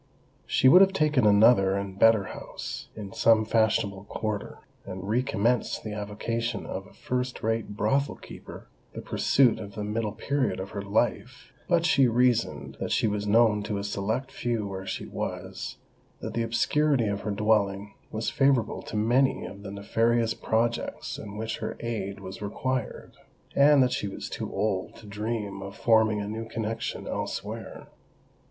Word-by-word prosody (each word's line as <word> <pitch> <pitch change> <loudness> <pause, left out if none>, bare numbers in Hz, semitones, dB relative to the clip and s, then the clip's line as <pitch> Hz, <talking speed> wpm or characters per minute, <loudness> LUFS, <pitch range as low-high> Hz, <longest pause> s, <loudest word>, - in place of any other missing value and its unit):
She 130 - +3
would 180 +8 +9
have 195 0 +5
taken 150 - +3
another 100 -2 +5
and 100 -1 -4
better 115 -2 +6
house, - - -7
in 100 -3 -7
some 110 -1 +4
fashionable 105 -3 +1
quarter, 105 0 -4 0.3
and 95 0 -7
re 115 +4 +2
commenced 120 0 0
the 110 - -5
avocation 110 +3 -3
of - - -5
a - - -18
first 125 0 -3
rate 110 -2 -1
brothel 135 +8 +1
keeper—the - - -12
pursuit 125 -4 +3
of 100 -2 -8
the 105 - -3
middle 105 0 -2
period 140 +1 -1
of 95 +1 -6
her 100 - -4
life;—but 120 - -1
she 140 -6 +5
reasoned 120 0 +1
that - - -3
she - - +2
was 105 0 -2
known 110 -1 +4
to 105 0 -3
a 100 - -3
select 110 +6 -2
few 115 -4 -2
where 95 -1 -6
she - - -4
was—that - - -7
the 115 - 0
obscurity 125 +3 +2
of 100 -1 -2
her - - -4
dwelling 100 -1 +1 0.2
was 110 +1 -2
favourable 135 -5 +2
to 110 - -5
many 125 +5 +2
of 100 +1 -9
the 100 - -7
nefarious 115 +3 +1
projects 115 +1 -1
in 105 0 -8
which 110 +1 -3
her - - -4
aid 100 -4 -4
was 95 0 -8
required—and 130 +5 0
that 125 - +1
she 105 - -2
was 95 - -6
too - - -4
old 100 -2 -1
to 110 - -14
dream 105 -1 -4
of 100 0 -8
forming 110 -2 +3
a 100 - -3
new 110 +1 -5
connexion 115 0 -4
elsewhere. - - -5
110 Hz, 160 wpm, -27 LUFS, 100-120 Hz, 0.3 s, would